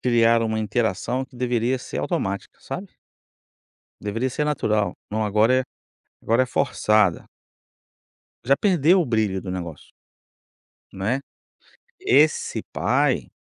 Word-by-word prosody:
Criar 115 -1 +3
uma 110 -1 -1
interação 110 +3 -1
que 130 -2 -18
deveria 125 +1 0
ser - - -6
automática, 100 +1 -3
sabe. - - -7 1.1
Deveria 115 +5 -2
ser 150 - -1
natural, 110 -10 0 0.2
não, 110 +1 -1
agora 110 +5 +3
é - - -1 0.6
agora 115 +3 +3
é - - -9
forçada. 110 -9 +2 1.2
Já 135 +3 +4
perdeu 180 -2 +3
o 170 - 0
brilho 110 -5 0
do 95 - -6
negócio 85 -5 -7 1.0
não 95 +1 -6
é. 125 +5 +1 0.8
Esse 150 +3 +2
pai 115 - +1
115 Hz, 120 wpm, -23 LUFS, 105-130 Hz, 1.2 s, Já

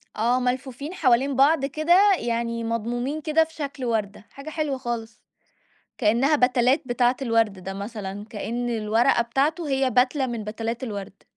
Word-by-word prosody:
آه 240 +3 +2
ملفوفين 255 +4 -3
حوالين 270 -4 +2
بعض 275 +1 +4
كده، 345 +8 +4
يعني 230 0 -2
مضمومين 240 +6 -2
كده 315 +1 +3
في 320 0 -11
شكل 280 -4 -5
وردة، 215 -3 -2
حاجة 280 +3 -9
حلوة 300 -3 -2
خالص، 235 -3 -5 0.8
كإنها 250 +7 +3
بَتَلات 250 +2 +3
بتاعة 245 0 +2
الورد 230 -3 +2
ده 195 - -4
مثلًا، 205 -1 -6
كإن 240 +3 -3
الورقة 225 +1 +2
بتاعته 290 +7 -1
هي 270 -1 +1
بَتلة 255 +3 +2
من 235 -3 -4
بَتَلات 225 +3 -4
الورد. 200 -5 -6
245 Hz, 150 wpm, -24 LUFS, 230-275 Hz, 0.8 s, بعض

